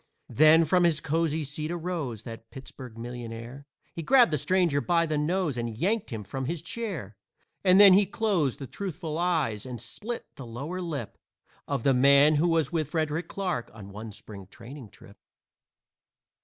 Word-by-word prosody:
Then 155 +2 +6
from 180 +3 +3
his 165 -3 +3
cozy 160 0 -1
seat 150 +2 -5
arose 165 - -4
That 115 -1 -10
Pittsburg 130 -3 -11
millionaire. 120 +3 -8 0.3
He 170 - -5
grabbed 240 - +5
the - - +2
stranger 175 -5 +1
by 170 0 +2
the 155 -1 -2
nose 155 -1 0
And 115 -2 -4
yanked 205 - 0
him 110 -3 -5
from 130 +7 -5
his 165 +3 -4
chair. 170 - -5 0.5
And 185 0 +5
then 200 -2 +9
he 195 +1 +5
closed 195 - 0
the 135 - -7
truthful 165 -1 -5
eyes 155 - 0
And 125 -2 -7
split 215 - -6
the 135 - -8
lower 145 +11 -5
lip 145 - -5 0.5
Of 140 -5 -2
the 135 - +4
man 140 +4 +5
who 165 +4 +2
was 165 -4 +1
with 155 -4 -1
Frederick 160 +1 -2
Clarke 180 -11 -3
On 100 -3 -10
one 110 +2 -8
Spring 100 -2 -11
training 120 +3 -11
trip. - - -17
150 Hz, 170 wpm, -27 LUFS, 120-175 Hz, 0.5 s, then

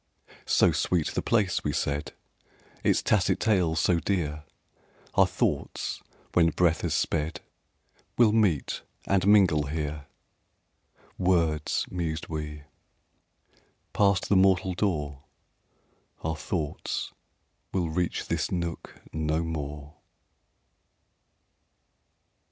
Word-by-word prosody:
"So - - +4
sweet 85 -4 0
the - - -2
place," 105 -6 +1
we 75 - -1
said, 70 +2 -2 0.7
"Its - - +2
tacit 100 -4 +2
tales 90 -7 +2
so 90 -2 +3
dear, 75 -4 -2 0.7
Our - - +5
thoughts, - - -2 0.3
when 85 -2 +5
breath 85 0 +2
has - - -1
sped, 75 +3 -1 0.8
Will 115 -3 +6
meet 100 -10 +1 0.2
and 100 -1 +2
mingle 90 -8 +5
here!"... 75 -1 -4 1.1
"Words!" 85 -4 +1
mused 85 -3 -3
we. 75 -2 -5 1.3
"Passed 100 -3 +2
the 100 - +3
mortal 95 -1 +4
door, 75 -8 -1 1.0
Our 80 0 -1
thoughts 80 -1 -3 0.6
will 85 -4 -1
reach 90 +1 -1
this - - -1
nook 85 -2 -4
no 80 +1 0
more." 75 -1 -6
80 Hz, 100 wpm, -27 LUFS, 75-95 Hz, 1.3 s, Will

